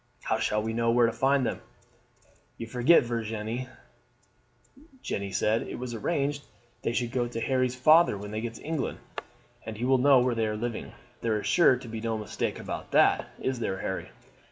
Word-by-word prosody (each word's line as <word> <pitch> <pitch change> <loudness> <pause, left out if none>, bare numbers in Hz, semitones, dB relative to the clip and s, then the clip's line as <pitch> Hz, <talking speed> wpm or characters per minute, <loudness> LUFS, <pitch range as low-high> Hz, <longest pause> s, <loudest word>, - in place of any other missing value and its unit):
How 110 - 0
shall 105 -1 0
we 110 +1 -2
know 115 0 +1
where 120 +1 +5
to 115 - +1
find 135 0 +2
them?" - - -3 1.0
"You 115 - -5
forget, 125 +8 +4
Virginie," 115 +1 -3 1.4
Jeanne 100 -1 -3
said, 110 +4 +1
"it - - -6
was 125 -1 -5
arranged 145 +4 -1 0.4
they - - -1
should 120 0 -1
go 125 -2 0
to 120 -1 -5
Harry's 130 0 0
father 155 -1 +5
when 105 +1 -7
they 110 +1 -3
got 115 0 -5
to - - -12
England, 155 -3 -2 0.7
and 110 -1 -7
he 120 - -2
will 130 0 +4
know 140 +1 +6
where 125 0 +2
they 115 -1 0
are 105 0 -2
living; 120 +1 -4 0.3
there 110 -2 0
is - - -7
sure 170 -7 +5
to 125 - -10
be 110 -1 -6
no 115 -1 -1
mistake 105 - -3
about - - -6
that, - - +4
is 130 -2 -2
there, 95 -4 -2
Harry?" 95 - -4
120 Hz, 195 wpm, -28 LUFS, 110-130 Hz, 1.4 s, know